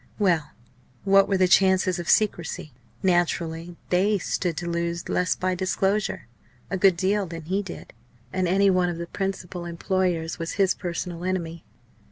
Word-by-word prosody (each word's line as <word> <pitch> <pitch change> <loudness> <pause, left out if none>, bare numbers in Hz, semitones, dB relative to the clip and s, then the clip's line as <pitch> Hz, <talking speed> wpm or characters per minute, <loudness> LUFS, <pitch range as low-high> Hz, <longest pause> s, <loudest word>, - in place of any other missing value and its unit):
Well! 175 -8 +2 0.5
what 195 0 +5
were 195 - +2
the 185 0 +4
chances 190 0 +4
of 175 - -5
secrecy? 175 - +1 0.3
Naturally 175 -2 0 0.2
they 200 +4 +3
stood 175 -2 -2
to 175 - -3
lose 170 0 -2
less 180 0 +1
by 185 0 -1
disclosure, 190 +3 -1 0.4
a 195 - 0
good 190 -2 +4
deal, 195 +2 +1
than 165 -1 -7
he 190 +5 -1
did. 190 -4 -9 0.4
And 185 -1 0
Denny, 195 +2 +4
one 180 -1 +2
of 170 - -4
the 170 - -4
principal 185 -1 -4
employers, 170 -1 -1
was 165 0 -3
his 195 -2 +3
personal 175 0 -5
enemy. 170 -3 -3
180 Hz, 160 wpm, -25 LUFS, 170-190 Hz, 0.5 s, what